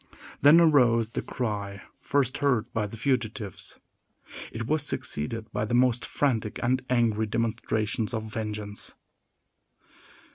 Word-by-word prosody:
Then 145 Hz, +5 st, +8 dB
arose 125 Hz, -9 st, +4 dB
the -, -, -2 dB
cry 100 Hz, -5 st, -4 dB, 0.2 s
first 135 Hz, -3 st, 0 dB
heard 125 Hz, -6 st, +1 dB
by 110 Hz, -2 st, 0 dB
the 115 Hz, -, -9 dB
fugitives. 115 Hz, -5 st, -2 dB, 0.7 s
It 115 Hz, 0 st, -4 dB
was 155 Hz, +5 st, +1 dB
succeeded 110 Hz, -, -3 dB
by 105 Hz, 0 st, -1 dB
the 120 Hz, -, 0 dB
most 125 Hz, -1 st, +3 dB
frantic 115 Hz, -7 st, 0 dB
and 125 Hz, +1 st, +1 dB
angry 115 Hz, -3 st, +2 dB
demonstrations 110 Hz, 0 st, -1 dB
of 110 Hz, -2 st, -2 dB
vengeance. 105 Hz, -1 st, -5 dB
115 Hz, 120 wpm, -27 LUFS, 105-125 Hz, 0.7 s, Then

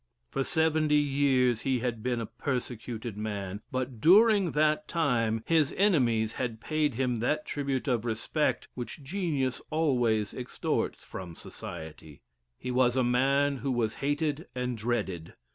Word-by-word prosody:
For 135 Hz, -, 0 dB
seventy 155 Hz, 0 st, +2 dB
years 135 Hz, -5 st, +3 dB
he 130 Hz, -1 st, +1 dB
had 120 Hz, -2 st, -2 dB
been 125 Hz, 0 st, -1 dB
a 115 Hz, -, -2 dB
persecuted 120 Hz, -3 st, -4 dB
man, 100 Hz, -2 st, -4 dB
but 130 Hz, -3 st, -3 dB
during 200 Hz, 0 st, +6 dB
that 150 Hz, 0 st, +2 dB
time 115 Hz, -9 st, +1 dB
his 160 Hz, -4 st, +2 dB
enemies 120 Hz, -, +3 dB
had 115 Hz, -3 st, -3 dB
paid 150 Hz, 0 st, 0 dB
him 125 Hz, -2 st, 0 dB
that 150 Hz, +6 st, 0 dB
tribute 140 Hz, -2 st, -2 dB
of 120 Hz, -4 st, +1 dB
respect 120 Hz, +6 st, -1 dB
which 125 Hz, +3 st, -7 dB
genius 150 Hz, -6 st, -1 dB
always 125 Hz, -9 st, +1 dB
extorts 125 Hz, -1 st, -2 dB
from 90 Hz, -3 st, -8 dB
society. 80 Hz, -2 st, -9 dB, 0.3 s
He 125 Hz, -, -4 dB
was 125 Hz, -1 st, +3 dB
a 130 Hz, -, +3 dB
man 135 Hz, +3 st, +2 dB
who 135 Hz, +1 st, -2 dB
was 115 Hz, -3 st, 0 dB
hated 145 Hz, +2 st, -1 dB
and 125 Hz, -1 st, -2 dB
dreaded. 105 Hz, -7 st, -3 dB
130 Hz, 145 wpm, -29 LUFS, 115-150 Hz, 0.3 s, during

